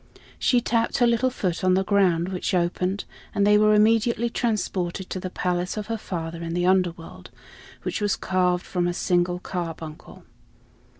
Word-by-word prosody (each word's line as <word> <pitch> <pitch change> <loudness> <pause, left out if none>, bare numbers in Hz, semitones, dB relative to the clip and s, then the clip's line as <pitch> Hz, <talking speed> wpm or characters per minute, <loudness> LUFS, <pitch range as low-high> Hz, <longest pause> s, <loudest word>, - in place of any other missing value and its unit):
She 245 -3 +3
tapped 230 -1 0
her 245 - +4
little 235 +2 +2
foot 185 -8 -3
on 185 0 +4
the 190 - +2
ground, 185 -4 +2
which 185 0 -2
opened; 180 +2 -1 0.3
and 200 - +3
they 210 0 +5
were 215 0 +5
immediately 230 +2 +3
transported 190 -6 -2
to 185 - -3
the 185 - -5
palace 180 +1 -2
of 210 - -3
her - - -2
father 170 -3 -5
in 165 0 -4
the 175 0 +1
Underworld, 180 -3 0 0.5
which - - -3
was 205 -1 +1
carved 180 -1 0
from 175 -1 -1
a 175 - -1
single 175 0 +1
carbuncle. 165 -4 -7
185 Hz, 170 wpm, -24 LUFS, 175-210 Hz, 0.5 s, they